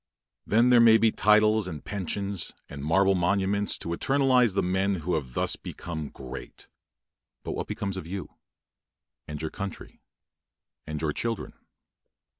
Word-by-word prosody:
Then 115 Hz, +4 st, +4 dB
there 120 Hz, -, +7 dB
may 115 Hz, -1 st, +7 dB
be 115 Hz, 0 st, +3 dB
titles, 105 Hz, 0 st, +4 dB
and 80 Hz, -4 st, -7 dB
pensions, 100 Hz, 0 st, -3 dB
and 70 Hz, -1 st, -8 dB
marble 95 Hz, +5 st, +3 dB
monuments 100 Hz, +3 st, +1 dB
to -, -, -6 dB
eternize 125 Hz, +1 st, +2 dB
the -, -, +2 dB
men 95 Hz, +2 st, +1 dB
who 90 Hz, +1 st, -3 dB
have 65 Hz, -6 st, -3 dB
thus -, -, +1 dB
become 80 Hz, -4 st, -6 dB
great; 65 Hz, -2 st, -10 dB, 0.8 s
but -, -, -4 dB
what -, -, -4 dB
becomes 100 Hz, -1 st, -3 dB
of 85 Hz, -, -6 dB
you, 95 Hz, +2 st, -6 dB, 1.0 s
and 75 Hz, -1 st, -6 dB
your 80 Hz, 0 st, -4 dB
country, 100 Hz, -2 st, -7 dB, 0.9 s
and 75 Hz, 0 st, -4 dB
your 75 Hz, -1 st, -1 dB
children? 115 Hz, -2 st, -3 dB
95 Hz, 145 wpm, -27 LUFS, 80-105 Hz, 1.0 s, there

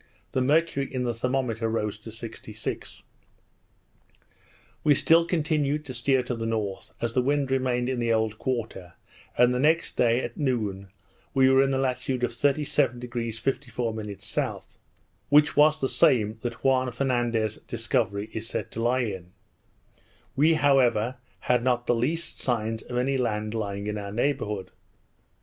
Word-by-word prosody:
The 130 Hz, -, 0 dB
mercury 145 Hz, 0 st, +1 dB
in 130 Hz, -1 st, -2 dB
the 120 Hz, -1 st, -1 dB
thermometer 120 Hz, -2 st, -1 dB
rose 105 Hz, -2 st, -2 dB
to 110 Hz, +1 st, -10 dB
66. 115 Hz, +1 st, -7 dB, 1.8 s
We 150 Hz, -2 st, +5 dB
still 165 Hz, +4 st, +4 dB
continued 150 Hz, -3 st, 0 dB
to 130 Hz, -, -6 dB
steer 130 Hz, +2 st, +2 dB
to 125 Hz, -, -3 dB
the 115 Hz, -1 st, -3 dB
north, 105 Hz, -4 st, -3 dB
as 115 Hz, -1 st, -2 dB
the 125 Hz, -, +3 dB
wind 140 Hz, +1 st, 0 dB
remained 125 Hz, -2 st, +1 dB
in 130 Hz, -1 st, -1 dB
the 115 Hz, -1 st, +1 dB
old 110 Hz, -1 st, 0 dB
quarter; 110 Hz, -8 st, -3 dB, 0.4 s
and 125 Hz, 0 st, +5 dB
the 125 Hz, -, 0 dB
next 160 Hz, +4 st, +2 dB
day, 120 Hz, +1 st, +3 dB
at 120 Hz, -, -5 dB
noon, 105 Hz, -9 st, -1 dB, 0.5 s
we 130 Hz, -1 st, +5 dB
were 135 Hz, 0 st, +6 dB
in 135 Hz, -, +2 dB
the 135 Hz, -, +1 dB
latitude 130 Hz, -1 st, -1 dB
37° 125 Hz, -3 st, 0 dB
54' 110 Hz, -5 st, -3 dB
S.; -, -, -20 dB, 0.5 s
which 150 Hz, +1 st, +5 dB
was 150 Hz, +1 st, +5 dB
the 135 Hz, -, +1 dB
same 110 Hz, -4 st, +3 dB
that 120 Hz, -1 st, -5 dB
Juan 130 Hz, -1 st, +2 dB
Fernandez's 120 Hz, -4 st, 0 dB
discovery 110 Hz, -3 st, -1 dB
is 110 Hz, 0 st, -4 dB
said -, -, -4 dB
to 115 Hz, -, -4 dB
lie 125 Hz, +2 st, +2 dB
in. 95 Hz, -6 st, -5 dB, 1.0 s
We, 155 Hz, +4 st, +4 dB
however, 130 Hz, -5 st, +3 dB, 0.2 s
had 125 Hz, -1 st, +1 dB
not 120 Hz, -1 st, +1 dB
the -, -, +2 dB
least 155 Hz, +8 st, -1 dB
signs 115 Hz, -2 st, -1 dB
of 125 Hz, -, -5 dB
any 135 Hz, +2 st, +1 dB
land 110 Hz, -3 st, -1 dB
lying 100 Hz, -2 st, -3 dB
in 105 Hz, 0 st, -3 dB
our 100 Hz, -1 st, -6 dB
neighbourhood. 105 Hz, -5 st, -1 dB
125 Hz, 155 wpm, -26 LUFS, 110-135 Hz, 1.8 s, were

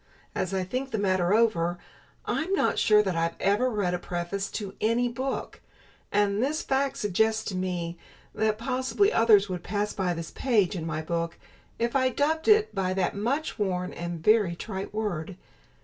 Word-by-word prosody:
As 185 Hz, -, -2 dB
I 190 Hz, -1 st, 0 dB
think 255 Hz, +8 st, -3 dB
the 220 Hz, -, -2 dB
matter 185 Hz, -3 st, +1 dB
over, 200 Hz, -6 st, +2 dB, 0.5 s
I'm 325 Hz, +4 st, -1 dB
not 390 Hz, -, +2 dB
sure 210 Hz, -1 st, +5 dB
that 190 Hz, -3 st, -1 dB
I 165 Hz, 0 st, 0 dB
ever 205 Hz, +6 st, +2 dB
read 205 Hz, -6 st, 0 dB
a 180 Hz, -, -1 dB
preface 175 Hz, +3 st, -3 dB
to 200 Hz, -3 st, -4 dB
any 230 Hz, +3 st, +2 dB
book; 260 Hz, +3 st, -4 dB, 0.5 s
and 205 Hz, 0 st, +2 dB
this 295 Hz, +5 st, 0 dB
fact 270 Hz, 0 st, 0 dB
suggests 220 Hz, +2 st, +1 dB
to 195 Hz, -, -4 dB
me 175 Hz, -2 st, -3 dB, 0.3 s
that 215 Hz, 0 st, +1 dB
possibly 260 Hz, -, +1 dB
others 215 Hz, -3 st, +5 dB
would 180 Hz, -2 st, -4 dB
pass 205 Hz, +3 st, -2 dB
by 180 Hz, -3 st, -1 dB
this 165 Hz, -1 st, -6 dB
page 215 Hz, -8 st, +1 dB
in 165 Hz, -2 st, -4 dB
my 155 Hz, 0 st, -3 dB
book 170 Hz, 0 st, -2 dB, 0.4 s
if 235 Hz, +2 st, -1 dB
I 260 Hz, -1 st, +3 dB
dubbed 310 Hz, +5 st, 0 dB
it 430 Hz, 0 st, +5 dB
by 185 Hz, -1 st, -1 dB
that 190 Hz, -2 st, 0 dB
much 245 Hz, +8 st, -2 dB
worn 180 Hz, -3 st, -1 dB
and 170 Hz, -1 st, -5 dB
very 210 Hz, -4 st, +4 dB
trite 190 Hz, +1 st, -5 dB
word. 195 Hz, -5 st, -3 dB
205 Hz, 180 wpm, -27 LUFS, 180-235 Hz, 0.5 s, sure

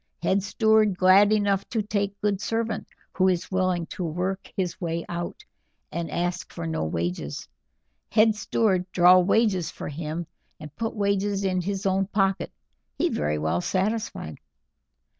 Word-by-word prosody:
Head 190 Hz, +3 st, +2 dB
steward 215 Hz, 0 st, +3 dB
glad 195 Hz, +2 st, +6 dB
enough 200 Hz, -2 st, +1 dB
to 225 Hz, -3 st, -1 dB
take 200 Hz, -1 st, -2 dB
good 205 Hz, -1 st, 0 dB
servant 225 Hz, -1 st, -2 dB, 0.3 s
who 185 Hz, 0 st, +3 dB
is 180 Hz, -1 st, 0 dB
willing 185 Hz, -2 st, +1 dB
to 185 Hz, -, -4 dB
work 180 Hz, +4 st, -3 dB
his 185 Hz, -2 st, -2 dB
way 165 Hz, -1 st, -2 dB
out, 175 Hz, -, -5 dB, 0.5 s
and 170 Hz, -1 st, -3 dB
ask 175 Hz, +1 st, -2 dB
for 85 Hz, -, -6 dB
no 80 Hz, -1 st, -2 dB
wages. 85 Hz, -2 st, -3 dB, 0.6 s
Head 220 Hz, +1 st, +4 dB
steward 195 Hz, -3 st, 0 dB
draw 180 Hz, +1 st, +7 dB
wages 190 Hz, -1 st, +2 dB
for -, -, -7 dB
him, 155 Hz, +3 st, -4 dB, 0.3 s
and 150 Hz, -1 st, -10 dB
put 225 Hz, 0 st, -3 dB
wages 200 Hz, -1 st, 0 dB
in 185 Hz, -1 st, +1 dB
his 195 Hz, +2 st, -3 dB
own 195 Hz, 0 st, +1 dB
pocket. 195 Hz, -1 st, 0 dB, 0.5 s
He -, -, +2 dB
very 75 Hz, 0 st, -1 dB
well 80 Hz, -, 0 dB
satisfied." 195 Hz, -, -2 dB
190 Hz, 150 wpm, -25 LUFS, 170-205 Hz, 0.6 s, draw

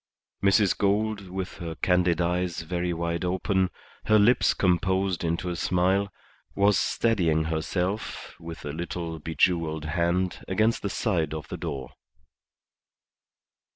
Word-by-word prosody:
Mrs. 100 Hz, 0 st, +4 dB
Gould, 100 Hz, 0 st, 0 dB
with 95 Hz, 0 st, -5 dB
her 85 Hz, -3 st, -5 dB
candid 90 Hz, -2 st, +2 dB
eyes 90 Hz, 0 st, 0 dB
very 90 Hz, +1 st, -2 dB
wide 85 Hz, 0 st, -2 dB
open, 95 Hz, +1 st, +1 dB, 0.4 s
her 110 Hz, -, +5 dB
lips 110 Hz, +4 st, +4 dB
composed 95 Hz, 0 st, +1 dB
into 85 Hz, +2 st, -1 dB
a 90 Hz, -, -2 dB
smile, 95 Hz, +3 st, +1 dB, 0.4 s
was 100 Hz, +1 st, +4 dB
steadying 85 Hz, -5 st, +2 dB
herself 90 Hz, +6 st, -2 dB
with 80 Hz, -1 st, -8 dB
a 70 Hz, -, -4 dB
little 85 Hz, 0 st, -4 dB
bejewelled 80 Hz, -1 st, 0 dB
hand 85 Hz, +3 st, 0 dB
against 110 Hz, +4 st, +1 dB
the 100 Hz, -, -2 dB
side 85 Hz, -, 0 dB
of 75 Hz, -, -7 dB
the -, -, -5 dB
door. 70 Hz, -6 st, -5 dB
90 Hz, 125 wpm, -26 LUFS, 85-95 Hz, 0.4 s, her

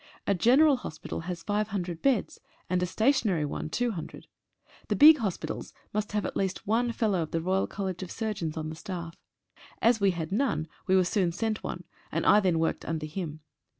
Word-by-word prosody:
A 200 Hz, -, +2 dB
general 260 Hz, -, +5 dB
hospital 160 Hz, -10 st, -6 dB
has 170 Hz, -2 st, -4 dB
five 210 Hz, 0 st, 0 dB
hundred 180 Hz, -5 st, -4 dB
beds, 265 Hz, -6 st, +1 dB, 0.3 s
and 180 Hz, 0 st, +2 dB
a. 180 Hz, -, +1 dB
stationary 220 Hz, -, +2 dB
one 145 Hz, -, -4 dB
two 245 Hz, +7 st, 0 dB
hundred. 170 Hz, -7 st, -7 dB, 0.6 s
The -, -, 0 dB
big 305 Hz, +1 st, +9 dB
hospitals 200 Hz, -7 st, -4 dB, 0.2 s
must 210 Hz, 0 st, -2 dB
have 210 Hz, -, 0 dB
at -, -, -4 dB
least 190 Hz, -1 st, -2 dB
one 235 Hz, +4 st, +2 dB
F.R.C.S. 190 Hz, -1 st, -1 dB
on 160 Hz, -7 st, -3 dB
the 160 Hz, -, -6 dB
staff. 170 Hz, -2 st, -6 dB, 0.7 s
As 230 Hz, -1 st, +3 dB
we 200 Hz, -, +5 dB
had 170 Hz, -2 st, -3 dB
none 195 Hz, -, 0 dB, 0.2 s
we 190 Hz, -, +4 dB
were 185 Hz, -, +5 dB
soon 180 Hz, -1 st, +1 dB
sent 215 Hz, +4 st, -2 dB
one, -, -, -5 dB, 0.3 s
and -, -, -1 dB
I 210 Hz, -, +7 dB
then 185 Hz, -5 st, +2 dB
worked 160 Hz, 0 st, 0 dB
under 160 Hz, -1 st, -3 dB
him. 155 Hz, -1 st, -5 dB
190 Hz, 175 wpm, -28 LUFS, 170-220 Hz, 0.7 s, big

